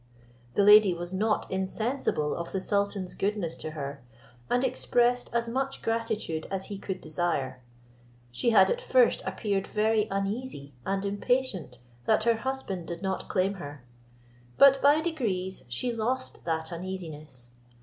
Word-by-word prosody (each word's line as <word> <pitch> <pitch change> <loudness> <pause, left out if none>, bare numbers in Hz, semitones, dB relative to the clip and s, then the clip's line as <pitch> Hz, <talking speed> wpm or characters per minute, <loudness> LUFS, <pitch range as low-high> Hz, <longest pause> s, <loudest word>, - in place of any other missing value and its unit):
The 200 - +4
lady 210 -2 +8
was 175 +1 -6
not 215 +3 +1
insensible 190 - -1
of 170 0 -5
the 190 - -1
sultan's 200 -1 -1
goodness 195 -5 -1
to - - -5
her, 140 -2 -5 0.5
and 245 +1 +2
expressed 245 -1 +1
as 235 0 0
much 270 +3 -2
gratitude 225 -8 -2
as 190 -1 -2
he 195 - -6
could 190 -1 -4
desire. 150 -5 -2 0.7
She 125 - +1
had 230 - +6
at - - -1
first - - +4
appeared 200 -3 -1
very 215 0 +2
uneasy 195 - -3
and 195 0 0
impatient 200 - -1 0.3
that 215 - +3
her 230 0 +3
husband 230 -9 -3
did 170 +2 -6
not 190 -1 -2
claim 190 +1 +1
her; 145 -3 -9 0.7
but 275 -1 +7
by 290 +3 +5
degrees 210 - -2
she 235 - -1
lost 250 +4 -2
that 160 0 -2
uneasiness. 160 -8 -6
195 Hz, 145 wpm, -28 LUFS, 170-235 Hz, 0.7 s, lady